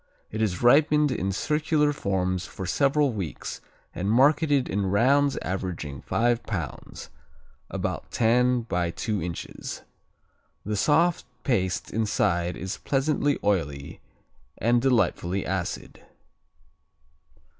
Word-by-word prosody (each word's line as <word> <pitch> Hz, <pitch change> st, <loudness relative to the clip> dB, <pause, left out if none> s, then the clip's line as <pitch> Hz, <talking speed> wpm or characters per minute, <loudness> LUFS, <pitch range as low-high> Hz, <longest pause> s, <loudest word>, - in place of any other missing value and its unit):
It 110 Hz, -, -3 dB
is 95 Hz, -4 st, -1 dB
ripened 150 Hz, +3 st, +5 dB
in 95 Hz, -6 st, -1 dB
circular 150 Hz, -, +1 dB
forms 95 Hz, -6 st, -1 dB
for 95 Hz, -, -7 dB
several 140 Hz, -, +2 dB
weeks 95 Hz, -7 st, -5 dB, 0.3 s
and 95 Hz, +3 st, -2 dB
marketed 140 Hz, +3 st, +4 dB
in 100 Hz, 0 st, -1 dB
rounds 135 Hz, +8 st, +3 dB
averaging 85 Hz, -8 st, -4 dB
five 120 Hz, 0 st, +1 dB
pounds, 85 Hz, -, -6 dB, 0.6 s
about -, -, -4 dB
ten 125 Hz, +2 st, +3 dB
by 90 Hz, -6 st, -1 dB
two 105 Hz, +4 st, -2 dB
inches. 85 Hz, 0 st, -6 dB, 0.8 s
The 105 Hz, +1 st, -1 dB
soft 165 Hz, -, +2 dB, 0.2 s
paste 95 Hz, -8 st, 0 dB
inside 95 Hz, -6 st, 0 dB
is 95 Hz, +2 st, -4 dB
pleasantly 145 Hz, +1 st, +1 dB
oily 75 Hz, -8 st, -1 dB, 0.6 s
and 120 Hz, +1 st, +2 dB
delightfully 100 Hz, -7 st, +1 dB
acid. 95 Hz, -1 st, -4 dB
110 Hz, 105 wpm, -26 LUFS, 95-135 Hz, 0.8 s, ripened